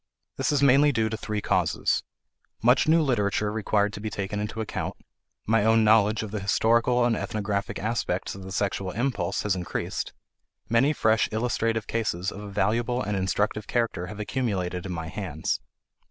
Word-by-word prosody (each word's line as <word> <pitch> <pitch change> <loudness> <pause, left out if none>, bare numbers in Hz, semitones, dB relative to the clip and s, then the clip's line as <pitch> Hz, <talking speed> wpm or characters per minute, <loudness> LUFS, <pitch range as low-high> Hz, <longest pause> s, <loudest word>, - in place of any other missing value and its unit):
This - - +1
is 145 -1 +2
mainly 140 +2 +6
due 110 -4 +1
to 110 - -3
three 105 -1 -3
causes: - - +1 0.6
Much 125 +6 +4
new 160 +1 +5
literature 105 -5 +1
required 105 -1 +1
to 105 - -7
be 110 - -3
taken 100 0 -3
into 105 +2 -4
account; 110 - -3 0.5
my 115 0 +3
own 110 +1 +4
knowledge 110 0 +4
of 105 - -6
the 105 - -2
historical 115 +5 +3
and 120 -1 +2
ethnographic 105 -2 -2
aspects 105 -4 -2
of 95 - -9
the 95 0 -8
sexual 100 -1 -1
impulse 115 -4 -1
has 105 -2 +1
increased; 90 -1 -3 0.6
many 115 +6 +3
fresh 110 -6 +2
illustrative 115 -1 0
cases 100 -5 -1
of 100 - -8
a 105 - -7
valuable 115 +5 0
and 105 - -2
instructive 105 +2 -1
character 115 -7 -1
have 105 +3 -8
accumulated 100 -6 -2
in - - -5
my 80 -2 -4
hands. 85 -4 -3
105 Hz, 170 wpm, -26 LUFS, 100-115 Hz, 0.6 s, mainly